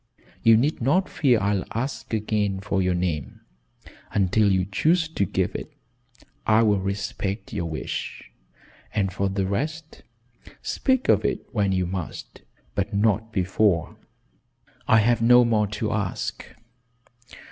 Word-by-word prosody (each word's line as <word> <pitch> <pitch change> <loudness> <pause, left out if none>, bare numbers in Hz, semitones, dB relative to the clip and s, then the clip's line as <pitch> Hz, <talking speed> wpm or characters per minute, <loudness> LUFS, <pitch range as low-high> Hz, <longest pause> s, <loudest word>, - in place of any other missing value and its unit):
You 115 -1 +6
need 140 +5 0
not 160 +10 +2
fear 125 -6 +2
I'll 100 -1 0
ask 115 -1 -4
again 105 -3 0
for 100 -1 -1
your 90 -1 +1
name. 85 -5 -3 0.7
Until 100 +1 +3
you 95 -1 +2
choose 165 - +2
to 160 -11 -1
give - - -1
it - - -6 0.8
I 110 +1 +5
will 105 -3 +3
respect 100 +1 -4
your 85 - -2
wish, 80 - -5 0.6
and 95 -3 0
for 100 +1 0
the 95 0 -1
rest 155 +11 -4 0.6
speak 260 -1 0
of - - +4
it - - -1
when 100 -4 +1
you 95 -1 +1
must 90 -2 -6 0.3
but 100 +1 -2
not 110 +1 +1
before. 95 -2 +1 0.9
I 110 - +6
have 120 +2 +2
no 120 +1 +6
more 110 -3 +2
to 110 +1 -3
ask. 100 -3 -3
105 Hz, 135 wpm, -24 LUFS, 95-115 Hz, 0.9 s, You